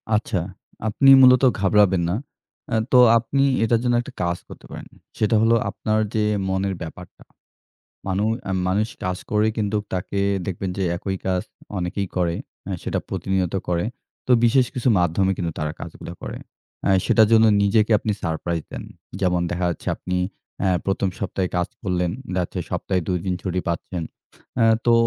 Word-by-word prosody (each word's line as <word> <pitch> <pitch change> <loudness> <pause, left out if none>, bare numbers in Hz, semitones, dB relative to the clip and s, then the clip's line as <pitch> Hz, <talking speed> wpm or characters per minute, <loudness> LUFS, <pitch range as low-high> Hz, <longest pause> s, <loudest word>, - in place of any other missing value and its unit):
আচ্ছা, 105 -2 0 0.5
আপনি 135 +6 +4
মূলত 130 0 +7 0.2
ঘাবড়াবেন 95 -2 +4
না। 90 - 0 0.5
অ্যা 115 - +1
তো 125 - +7 0.2
আপনি 125 +4 0 0.2
এটার 115 0 +3
জন্য 120 -1 +2
একটা - - -10
কাজ 85 0 0
করতে - - -12
পারেন। - - -8 0.3
সেটা 110 +1 +2
হলো 115 +1 +4
আপনার 110 +2 -1 0.2
যে, 110 - +2 0.3
মনের 95 0 -1
ব্যাপারটা। 80 -2 -9 0.8
মানু 95 +2 0 0.2
অ্যা 95 - -3
মানুষ 105 +4 +1 0.2
কাজ 90 0 -1
করে 105 +1 +3
কিন্তু 105 -1 0 0.2
তাকে 95 +2 -2 0.3
দেখবেন 95 0 -3
যে, 95 - 0
একই 95 0 -3
কাজ 90 -1 +1 0.4
অনেকেই 95 +2 -2
করে। 85 -1 +1 0.3
অ্যা - - -4
সেটা - - -1
প্রতিনিয়ত 95 -2 -1
করে। 85 +2 0 0.4
তো 125 - +2
বিশেষ 125 +2 +4
কিছু 125 0 +1
মাধ্যমে 90 +3 +2
কিন্তু 85 -2 -2
তারা 75 0 -1
কাজগুলা - - -8
করে। - - -6 0.5
অ্যা - - +2
সেটার 110 -2 +5
জন্য 115 0 +6 0.2
নিজেকে 105 +2 +3
আপনি 110 - -1
সারপ্রাইজ 85 0 -2
দেন। - - -6 0.4
যেমন 90 -2 +2
দেখা 90 +1 -1
যাচ্ছে 85 - -6
আপনি 90 0 -3 0.4
অ্যা 95 - +2
১ম 95 0 0
সপ্তাহে 95 -1 -2
কাজ 90 - 0
করলেন, 90 -4 0 0.2
দেখা 90 -1 +1
হচ্ছে 90 - -6
সপ্তাহে 90 +1 -1
২ 90 -1 +1
দিন 95 - 0
ছুটি 90 -1 -2
পাচ্ছেন। 85 0 -3 0.5
অ্যা 115 - +4 0.2
তো 120 - +5
95 Hz, 170 wpm, -22 LUFS, 90-110 Hz, 0.8 s, মূলত